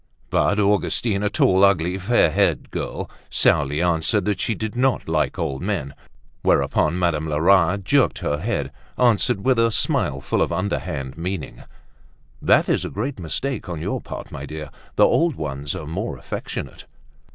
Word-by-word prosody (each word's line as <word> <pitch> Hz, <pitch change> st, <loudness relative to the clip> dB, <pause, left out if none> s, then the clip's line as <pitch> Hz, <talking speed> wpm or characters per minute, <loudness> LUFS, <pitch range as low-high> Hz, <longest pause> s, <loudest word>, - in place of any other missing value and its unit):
But 105 Hz, -, +2 dB
Augustine, 105 Hz, +1 st, +1 dB
a 105 Hz, -, +1 dB
tall, 95 Hz, -1 st, +3 dB
ugly, 95 Hz, -1 st, +3 dB
fair 95 Hz, -4 st, +3 dB
haired -, -, +1 dB
girl, -, -, -4 dB, 0.2 s
sourly 75 Hz, +3 st, +2 dB
answered 90 Hz, +4 st, +1 dB
that 105 Hz, -1 st, 0 dB
she 115 Hz, -, 0 dB
did 110 Hz, +1 st, -5 dB
not 130 Hz, +1 st, +1 dB
like 80 Hz, -1 st, 0 dB
old 65 Hz, -, -2 dB
men; 90 Hz, -8 st, -2 dB, 0.5 s
whereupon 80 Hz, +3 st, +2 dB
Madame 80 Hz, -3 st, 0 dB
Lerat, 90 Hz, +5 st, +3 dB
jerking 140 Hz, +6 st, +2 dB
her 75 Hz, -, 0 dB
head, 75 Hz, -, -2 dB, 0.3 s
answered 120 Hz, -3 st, +2 dB
with 130 Hz, -3 st, +3 dB
a 115 Hz, 0 st, +4 dB
smile 70 Hz, -10 st, 0 dB
full -, -, -1 dB
of -, -, +1 dB
underhand 85 Hz, -6 st, -3 dB
meaning: 90 Hz, -4 st, -5 dB, 0.8 s
"That -, -, +4 dB
is -, -, +1 dB
a -, -, -4 dB
great 125 Hz, +4 st, -4 dB
mistake 105 Hz, -, -3 dB
on 85 Hz, -3 st, -4 dB
your -, -, -3 dB
part, -, -, -8 dB
my 70 Hz, +1 st, -7 dB
dear; 75 Hz, -1 st, -7 dB, 0.2 s
the -, -, +6 dB
old 165 Hz, -3 st, +2 dB
ones 70 Hz, -3 st, -4 dB
are 90 Hz, -5 st, -6 dB
more 80 Hz, +3 st, -4 dB
affectionate." -, -, -6 dB
90 Hz, 165 wpm, -22 LUFS, 75-105 Hz, 0.8 s, the